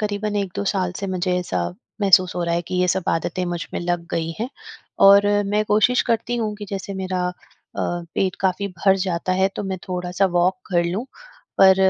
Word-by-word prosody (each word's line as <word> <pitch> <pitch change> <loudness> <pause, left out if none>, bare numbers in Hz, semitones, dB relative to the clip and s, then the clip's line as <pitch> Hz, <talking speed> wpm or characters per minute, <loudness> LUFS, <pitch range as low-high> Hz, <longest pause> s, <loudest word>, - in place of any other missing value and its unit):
करीबन 210 0 -2
1-2 200 0 -2
साल 185 -3 0
से 195 - -3
मुझे 185 -1 -1
ऐसा 175 - -2 0.4
महसूस 185 -2 +5
हो 175 - -1
रहा 170 0 0
है 170 - 0
कि 185 - -4
ये 180 0 +2
सब 185 0 0
आदतें 175 +2 -1
मुझ 175 -1 -3
में - - -1
लग 175 -1 -2
गई 165 0 -1
हैं 230 +3 -2 0.6
और 200 +1 +8 0.2
मैं 210 +1 +1
कोशिश 215 +4 +3
करती 230 +1 0
हूँ 215 -2 -1
कि 205 - -7
जैसे 195 0 -4
मेरा 185 -1 -1
अ, - - -4 0.5
पेट 175 +2 -2
काफ़ी 195 +1 0
भर 195 +2 +4
जाता 185 -1 -1
है, 190 +1 +3
तो - - -2
मैं 190 -1 -3
थोड़ा-सा 180 +1 0
वॉक 180 +2 +3
कर 175 -2 +2
लूँ, 185 +8 -2 0.6
पर 190 -1 +8
185 Hz, 200 wpm, -22 LUFS, 175-200 Hz, 0.6 s, और